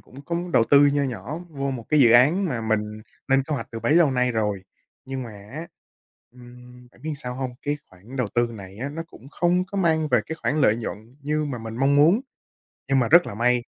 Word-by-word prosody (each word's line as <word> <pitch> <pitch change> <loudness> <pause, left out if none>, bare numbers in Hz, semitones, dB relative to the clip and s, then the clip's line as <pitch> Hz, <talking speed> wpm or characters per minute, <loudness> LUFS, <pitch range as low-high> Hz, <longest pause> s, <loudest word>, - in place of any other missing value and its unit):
cũng 135 +3 -14
có 170 - -2 0.2
đầu 115 - +5
tư 145 0 +7
nho 145 0 +1
nhỏ 125 - -4
vô 140 -3 -3
một 120 -4 -5
cái 150 - +4
dự 120 -4 +7
án 150 +11 +5
mà 125 -10 -2
mình 110 -1 +1 0.5
lên 135 0 +4
kế 150 +2 -3
hoạch - - -4
từ 115 -1 -6
bấy 145 - +1
lâu 170 -4 +5
nay 125 -1 +1
rồi, 105 -4 -1 0.4
nhưng 135 0 -5
mà 115 - -8 0.2
á, 160 +3 -6 0.7
ừm, 125 0 -15
biết 160 - -5
làm - - -3
sao 125 -4 -6
hông? 130 -1 -3
Cái 145 0 -1
khoản 100 +9 -13
đầu 125 - 0
tư 120 0 +2
này 100 -1 -11
á 135 +4 -3
nó 160 +3 -5
cũng 135 -4 -15
không 180 +3 +1
có 200 +1 -5
mang 160 -3 +2
về 125 -5 +3
cái 160 - -5
khoản 150 +1 0
lợi 110 -5 +4
nhuận 115 +2 -7
như 150 +2 -1
mà 135 -4 -4
mình 110 0 -7
mong 135 +3 +3
muốn. 165 - +5 0.7
Nhưng 135 -1 +4
mà 120 - +1
rất 170 +5 +6
là - - -6
may 120 +1 +2
130 Hz, 240 wpm, -24 LUFS, 120-150 Hz, 0.7 s, tư